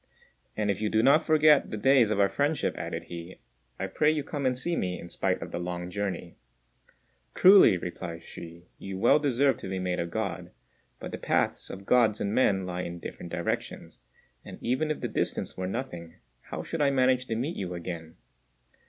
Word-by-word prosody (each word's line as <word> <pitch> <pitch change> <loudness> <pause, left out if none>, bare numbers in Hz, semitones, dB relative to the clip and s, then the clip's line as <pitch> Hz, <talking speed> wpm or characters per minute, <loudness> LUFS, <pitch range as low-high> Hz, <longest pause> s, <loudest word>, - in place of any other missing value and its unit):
"And 105 -1 +1
if 100 - -4
you 105 - 0
do 110 +1 +2
not 140 +5 +6
forget 155 -2 +4
the 110 - -4
days 125 0 +4
of 105 -2 0
our 100 - +5
friendship," 145 +7 0
added - - -5
he, 85 +1 -9 0.4
"I - - -1
pray 150 - +2
you 155 -2 0
come 145 -2 -2
and 125 -1 0
see 170 +7 -1
me, 90 - -2
in 85 - -9
spite - - -1
of - - -9
the 85 - -3
long 90 0 -4
journey." 95 -3 -4 1.0
"Truly," 190 - +7
replied 85 -1 -6
Hsü, 85 0 -11 0.2
"you 95 -1 -6
well 120 +9 +5
deserved 140 -2 +2
to - - -7
be 95 - -3
made 90 -1 -2
a 85 - -1
God; 100 -1 -4 0.5
but - - -7
the - - -6
paths - - 0
of 95 +1 -8
Gods 115 -3 +3
and 100 0 -1
men 95 -7 +2
lie 90 0 -3
in 85 -1 -5
different - - -8
directions, - - -4 0.4
and - - -10
even 130 +6 -1
if 155 - -2
the - - -1
distance - - -2
were 95 0 -3
nothing, 85 -7 -5 0.3
how - - -6
should 165 - -4
I 140 - +4
manage 130 -1 +2
to 115 - -2
meet 135 +9 -2
you 90 -2 -4
again?" 85 -2 -7
105 Hz, 200 wpm, -28 LUFS, 90-135 Hz, 1.0 s, Truly